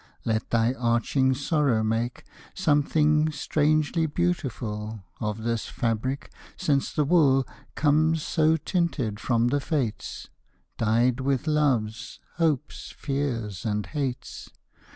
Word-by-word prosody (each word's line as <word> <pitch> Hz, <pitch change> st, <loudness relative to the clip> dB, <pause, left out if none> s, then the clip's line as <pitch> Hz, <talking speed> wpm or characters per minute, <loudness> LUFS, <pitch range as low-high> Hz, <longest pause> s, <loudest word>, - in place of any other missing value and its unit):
Let 110 Hz, 0 st, -1 dB
thy 115 Hz, +1 st, +2 dB, 0.2 s
aching 130 Hz, +2 st, +1 dB
sorrow 140 Hz, -5 st, +1 dB
make 115 Hz, +2 st, -1 dB, 0.3 s
Something 150 Hz, -2 st, +2 dB
strangely 155 Hz, +2 st, +1 dB
beautiful 115 Hz, -, -2 dB, 0.2 s
Of 105 Hz, 0 st, -3 dB
this 115 Hz, -1 st, -1 dB
fabric, 120 Hz, +4 st, -2 dB, 0.3 s
since 140 Hz, -2 st, +1 dB
the 150 Hz, -, +1 dB
wool 140 Hz, -5 st, +4 dB, 0.3 s
Comes 155 Hz, +1 st, +2 dB
so 160 Hz, -1 st, +2 dB
tinted 145 Hz, -, -1 dB
from 120 Hz, +1 st, +1 dB
the 145 Hz, +3 st, +1 dB
Fates, 135 Hz, -6 st, -3 dB, 0.5 s
Dyed 120 Hz, +3 st, +2 dB
with 135 Hz, +1 st, 0 dB
loves, 135 Hz, -8 st, 0 dB, 0.2 s
hopes, 155 Hz, -4 st, -1 dB
fears, 120 Hz, -, -3 dB
and 105 Hz, -1 st, -1 dB
hates. 135 Hz, -4 st, -4 dB
135 Hz, 110 wpm, -26 LUFS, 115-150 Hz, 0.5 s, wool